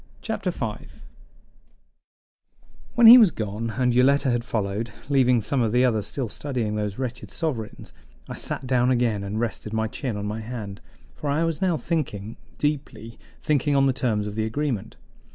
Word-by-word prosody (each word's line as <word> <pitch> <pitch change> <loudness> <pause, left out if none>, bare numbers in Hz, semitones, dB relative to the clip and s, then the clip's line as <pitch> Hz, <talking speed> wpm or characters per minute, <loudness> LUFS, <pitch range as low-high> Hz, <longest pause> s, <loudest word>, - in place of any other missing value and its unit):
Chapter - - -2
5 - - -6 1.9
When 240 - +5
he 240 +3 +12
was 215 -5 +7
gone, 110 -2 -4
and 125 -1 +2
Yoletta 135 +2 +4
had 120 -1 0
followed, 110 0 -2 0.2
leaving 125 -4 +4
some 125 +5 0
of 115 -2 +1
the 125 +2 +4
others 110 -5 0
still 130 -4 -3
studying 120 -2 -3
those 105 -2 -3
wretched 125 -5 -5
sovereigns, 130 - -4 0.3
I - - -6
sat 130 - -3
down 125 -1 +2
again 120 -5 +1
and 100 +2 -3
rested 110 -2 -3
my 110 0 0
chin 120 -1 -4
on 100 - -4
my 105 +2 -3
hand; 110 -3 -7 0.3
for 145 - -5
I 150 +4 +1
was 165 +1 -2
now 180 -4 +2
thinking 115 -8 -3 0.2
deeply: 135 -6 -3 0.2
thinking 145 -1 +1
on 135 0 +4
the 135 - +3
terms 110 -5 0
of 105 - -5
the 110 +1 -1
agreement. 120 -2 -3
120 Hz, 170 wpm, -24 LUFS, 110-140 Hz, 1.9 s, he